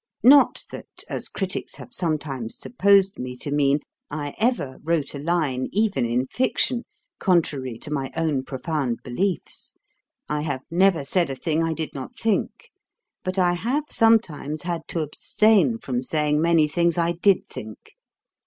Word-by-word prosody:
Not 275 Hz, +4 st, +6 dB
that, -, -, -7 dB
as -, -, -3 dB
critics 190 Hz, -2 st, -4 dB
have -, -, -11 dB
sometimes 145 Hz, -8 st, -2 dB
supposed 200 Hz, -3 st, +3 dB
me 125 Hz, 0 st, -5 dB
to 145 Hz, -, -3 dB
mean, 145 Hz, 0 st, +2 dB, 0.3 s
I 145 Hz, -1 st, -4 dB
ever 225 Hz, -, 0 dB
wrote 160 Hz, -3 st, 0 dB
a 140 Hz, -, -5 dB
line, 145 Hz, -5 st, 0 dB
even 205 Hz, -, +1 dB
in 120 Hz, +2 st, 0 dB
fiction, 250 Hz, -, +1 dB, 0.3 s
contrary 145 Hz, -, +1 dB
to 150 Hz, -, -7 dB
my 135 Hz, -2 st, -2 dB
own 155 Hz, -5 st, +1 dB
profound 130 Hz, -2 st, -3 dB
beliefs. 180 Hz, +10 st, -3 dB, 0.5 s
I 150 Hz, 0 st, -1 dB
have 140 Hz, -4 st, -3 dB
never 175 Hz, -4 st, +3 dB
said 170 Hz, +2 st, +1 dB
a 135 Hz, -, -3 dB
thing 160 Hz, +3 st, 0 dB
I 165 Hz, 0 st, 0 dB
did 160 Hz, -1 st, -3 dB
not 140 Hz, -, -8 dB
think: 220 Hz, -3 st, -1 dB, 0.5 s
but 185 Hz, +1 st, -3 dB
I 180 Hz, -1 st, +3 dB
have 240 Hz, +12 st, 0 dB
sometimes 180 Hz, -10 st, +2 dB
had 170 Hz, -2 st, -3 dB
to 165 Hz, -, -2 dB
abstain 215 Hz, -, +2 dB
from 125 Hz, -, -3 dB
saying 150 Hz, +2 st, +1 dB
many 165 Hz, -2 st, +4 dB
things 170 Hz, +2 st, +1 dB
I 170 Hz, 0 st, +2 dB
did 180 Hz, +3 st, +2 dB
think. -, -, -10 dB
160 Hz, 155 wpm, -24 LUFS, 140-190 Hz, 0.5 s, Not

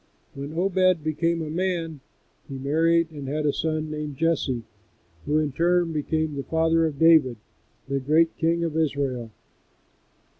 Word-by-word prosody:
When 140 Hz, +3 st, -7 dB
Obed 185 Hz, -2 st, +2 dB
became 165 Hz, +2 st, 0 dB
a 155 Hz, -, -5 dB
man 170 Hz, -3 st, -2 dB, 0.5 s
he 135 Hz, -, -5 dB
married 165 Hz, +4 st, +2 dB
and 145 Hz, -3 st, -7 dB
had 150 Hz, +2 st, -2 dB
a 145 Hz, -, +2 dB
son 155 Hz, -1 st, -2 dB
named 150 Hz, -2 st, -5 dB
Jesse, 145 Hz, -7 st, 0 dB, 0.6 s
who 150 Hz, -, +2 dB
in 155 Hz, -2 st, 0 dB
turn 175 Hz, +3 st, +1 dB
became 155 Hz, 0 st, -1 dB
the 140 Hz, -, -3 dB
father 165 Hz, +1 st, +2 dB
of 150 Hz, -3 st, -6 dB
David, 155 Hz, -7 st, +5 dB, 0.5 s
the 140 Hz, 0 st, -1 dB
great 155 Hz, +5 st, +2 dB
king 170 Hz, +1 st, +1 dB
of 165 Hz, -2 st, -2 dB
Israel. 140 Hz, -6 st, -1 dB
155 Hz, 150 wpm, -25 LUFS, 145-165 Hz, 0.6 s, David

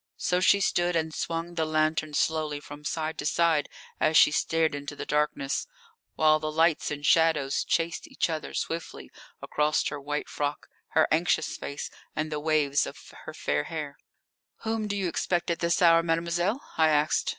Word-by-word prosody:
So 180 Hz, -, +1 dB
she 200 Hz, +2 st, +4 dB
stood 175 Hz, -2 st, +1 dB
and 160 Hz, -1 st, -1 dB
swung 165 Hz, +2 st, -3 dB
the 165 Hz, -2 st, 0 dB
lantern 155 Hz, -1 st, 0 dB
slowly 155 Hz, -2 st, 0 dB
from 145 Hz, 0 st, -11 dB
side 155 Hz, +1 st, -3 dB
to -, -, -3 dB
side 165 Hz, -3 st, +2 dB, 0.3 s
as 155 Hz, -, +3 dB
she -, -, +7 dB
stared 160 Hz, 0 st, +1 dB
into 145 Hz, 0 st, -6 dB
the -, -, -6 dB
darkness, 150 Hz, -, -1 dB, 0.5 s
while 155 Hz, 0 st, +4 dB
the 155 Hz, 0 st, -3 dB
lights 160 Hz, 0 st, +2 dB
and 145 Hz, 0 st, -5 dB
shadows 160 Hz, -5 st, +3 dB
chased 165 Hz, 0 st, -1 dB
each -, -, -1 dB
other 160 Hz, -2 st, -5 dB
swiftly 165 Hz, 0 st, -4 dB, 0.3 s
across 150 Hz, 0 st, +1 dB
her 145 Hz, -1 st, -6 dB
white 150 Hz, +1 st, -3 dB
frock, 145 Hz, 0 st, -3 dB, 0.3 s
her 160 Hz, -, +5 dB
anxious 165 Hz, +3 st, +1 dB
face, 140 Hz, -, -6 dB, 0.2 s
and 155 Hz, 0 st, -2 dB
the 150 Hz, -, -2 dB
waves 150 Hz, -2 st, +1 dB
of -, -, -8 dB, 0.3 s
her -, -, -7 dB
fair 75 Hz, 0 st, -1 dB
hair. 150 Hz, -3 st, -5 dB, 0.7 s
"Whom 220 Hz, -1 st, -1 dB
do 205 Hz, -, -2 dB
you 190 Hz, -2 st, 0 dB
expect 175 Hz, 0 st, -1 dB
at 170 Hz, -, -2 dB
this 170 Hz, +2 st, +1 dB
hour, 165 Hz, -1 st, +7 dB
mademoiselle?" 170 Hz, +6 st, 0 dB, 0.2 s
I 160 Hz, 0 st, +5 dB
asked. 150 Hz, -1 st, +2 dB
155 Hz, 175 wpm, -27 LUFS, 150-170 Hz, 0.7 s, she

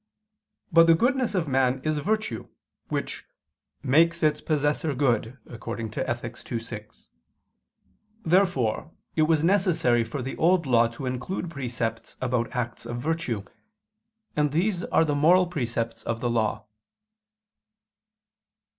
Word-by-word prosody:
But 165 Hz, 0 st, +7 dB
the 165 Hz, -, +7 dB
goodness 250 Hz, +2 st, +1 dB
of 175 Hz, -4 st, 0 dB
man 130 Hz, -1 st, +2 dB
is 155 Hz, -1 st, 0 dB
virtue, 215 Hz, +7 st, -2 dB, 0.4 s
which -, -, -3 dB, 0.6 s
"makes 165 Hz, +5 st, +3 dB
its 150 Hz, -1 st, +2 dB
possessor 150 Hz, -1 st, 0 dB
good" 125 Hz, -2 st, 0 dB
(Ethic. 115 Hz, +1 st, -5 dB
ii, 115 Hz, -, 0 dB
6). 110 Hz, -2 st, -10 dB, 1.2 s
Therefore 165 Hz, -, +2 dB, 0.2 s
it 155 Hz, -, +2 dB
was 155 Hz, 0 st, +3 dB
necessary 165 Hz, -, +3 dB
for 135 Hz, +3 st, -5 dB
the 135 Hz, -, -4 dB
Old 170 Hz, 0 st, +3 dB
Law 120 Hz, -3 st, +4 dB
to 115 Hz, +4 st, -8 dB
include 130 Hz, +8 st, -3 dB
precepts 120 Hz, -5 st, -4 dB
about 125 Hz, -2 st, 0 dB
acts 120 Hz, -1 st, -3 dB
of 120 Hz, 0 st, -4 dB
virtue: 130 Hz, -7 st, -2 dB, 0.9 s
and 150 Hz, -1 st, +2 dB
these 180 Hz, +3 st, 0 dB
are 165 Hz, -, +3 dB
the 150 Hz, -, 0 dB
moral 170 Hz, +6 st, +5 dB
precepts 115 Hz, -8 st, -3 dB
of 115 Hz, 0 st, -3 dB
the 120 Hz, 0 st, -1 dB
Law. 110 Hz, -3 st, 0 dB
140 Hz, 125 wpm, -26 LUFS, 120-165 Hz, 1.2 s, But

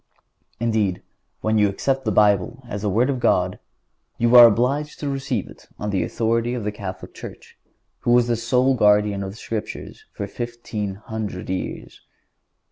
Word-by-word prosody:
Indeed, 110 Hz, -5 st, 0 dB, 0.4 s
when 110 Hz, 0 st, +1 dB
you 105 Hz, -1 st, +4 dB
accept 135 Hz, +6 st, -1 dB
the 110 Hz, -, +1 dB
Bible 105 Hz, +5 st, +2 dB
as 105 Hz, -4 st, -5 dB
the 105 Hz, -, 0 dB
Word 120 Hz, +8 st, +2 dB
of 130 Hz, -, -3 dB
God, 90 Hz, -6 st, +1 dB, 0.6 s
you 120 Hz, +1 st, +3 dB
are 120 Hz, -1 st, +12 dB
obliged 135 Hz, +7 st, 0 dB
to 145 Hz, -, -3 dB
receive 135 Hz, -6 st, -2 dB
it -, -, -15 dB
on 105 Hz, 0 st, -3 dB
the 95 Hz, -, +1 dB
authority 115 Hz, +1 st, 0 dB
of 120 Hz, -, -4 dB
the 105 Hz, -, -1 dB
Catholic 100 Hz, -2 st, -7 dB
Church, -, -, -11 dB, 0.4 s
who -, -, -3 dB
was 120 Hz, 0 st, +5 dB
the 120 Hz, -1 st, +1 dB
sole 125 Hz, +3 st, +2 dB
Guardian 105 Hz, -3 st, +3 dB
of 95 Hz, -, -4 dB
the 100 Hz, -, -10 dB
Scriptures 110 Hz, -2 st, -6 dB
for 100 Hz, -, -5 dB
fifteen 110 Hz, -2 st, -5 dB
hundred 105 Hz, -3 st, -5 dB
years. 95 Hz, -, -5 dB
110 Hz, 170 wpm, -22 LUFS, 100-120 Hz, 0.6 s, are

